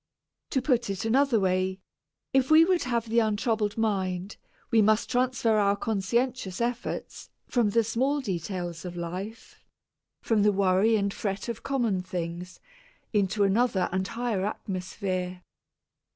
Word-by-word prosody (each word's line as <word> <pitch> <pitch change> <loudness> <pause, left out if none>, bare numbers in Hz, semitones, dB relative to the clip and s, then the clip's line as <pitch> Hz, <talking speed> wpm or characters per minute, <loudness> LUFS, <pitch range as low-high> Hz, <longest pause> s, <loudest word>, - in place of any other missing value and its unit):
To 265 - 0
put 245 -6 +1
it 195 +1 -3
another 255 +1 +3
way, 185 0 0 0.5
if 265 -1 +3
we 315 +1 +8
would 365 -1 +2
have 235 -2 -1
the 230 +1 +3
untroubled 215 -1 0
mind, 195 -3 -1 0.3
we 225 - +5
must 215 +3 +2
transfer 245 -3 +2
our 200 -1 +3
conscientious 220 0 -1
efforts 240 +1 -3 0.2
from 235 -4 +1
the 230 +3 +3
small 260 +6 0
details 175 - -4
of 175 -1 -7
life 185 +6 -7 0.6
from 220 -2 +2
the 210 +1 +5
worry 195 +3 +3
and 200 -2 0
fret 200 +1 -3
of 230 -1 -4
common 235 -9 0
things 180 0 -5 0.5
into 205 0 +2
another 200 -1 +2
and 190 +1 -1
a - - -9
higher 230 -5 -1
atmosphere. 185 -2 -4
210 Hz, 140 wpm, -27 LUFS, 190-235 Hz, 0.6 s, we